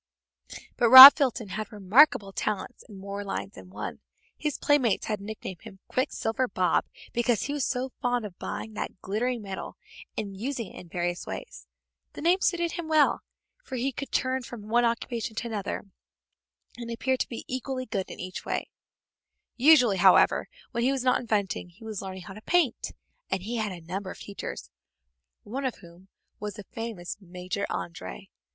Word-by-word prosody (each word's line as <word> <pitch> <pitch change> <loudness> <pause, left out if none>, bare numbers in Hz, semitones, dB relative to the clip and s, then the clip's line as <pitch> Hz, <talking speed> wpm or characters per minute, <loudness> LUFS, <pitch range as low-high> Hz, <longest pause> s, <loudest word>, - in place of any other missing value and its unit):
But 235 - +3
Rob 260 +3 +15
Fulton 245 -7 -1
had 215 +3 -5
remarkable 205 0 +4
talents 210 +5 -3
in 205 - -11
more 200 +1 -6
lines 100 - -5
than 95 -1 -13
one. 105 +2 -6 0.4
His 300 -2 -3
playmates 275 -8 +2
had 210 -2 -3
nicknamed 200 -3 -7
him 215 -4 -12
"Quicksilver 255 -2 -1
Bob" 185 -4 +1 0.3
because 240 -2 +1
he 285 - -3
was 290 -2 -1
so 255 0 -2
fond 245 -2 0
of 190 -4 -10
buying 220 - -5
that 200 - -5
glittering 230 +4 -2
metal 195 -1 -7 0.4
and 200 -2 -4
using 230 0 -4
it - - -9
in 175 - -13
various 175 +1 -3
ways. 60 +1 -8 0.5
The - - -8
name 350 +3 +4
suited 340 -1 +1
him 340 -2 -5
well, 310 -2 +3 0.4
for 265 - -7
he 255 +2 -1
could 275 +1 -7
turn 260 0 0
from 230 -4 -9
one 240 +1 +3
occupation 230 -1 -2
to 235 - -3
another, 210 -4 -4 0.9
and 235 -1 -7
appeared 255 +3 -1
to - - -1
be 235 - -7
equally 255 0 -4
good 195 -5 -3
in - - -9
each. 185 +1 -6 1.1
Usually, 250 -6 +6
however, 180 - +5 0.2
when 235 - -2
he 260 - +3
was 270 -2 -1
not 255 -1 +3
inventing 205 -6 -1
he 175 +6 -18
was 215 -3 -5
learning 190 -1 -7
how 190 - -9
to 215 - -11
paint, 325 -3 +1 0.4
and 190 - -2
he 235 +4 -3
had 215 -2 -1
a 175 -2 -8
number 190 +3 -5
of - - -8
teachers, 200 - -7 0.7
one 260 +7 -5
of 260 -3 -1
whom 175 +1 -16 0.3
was 210 -1 -5
the 205 - -9
famous 225 -6 -6
Major 185 +2 -4
André. 175 +3 -6
220 Hz, 175 wpm, -27 LUFS, 195-255 Hz, 1.1 s, Rob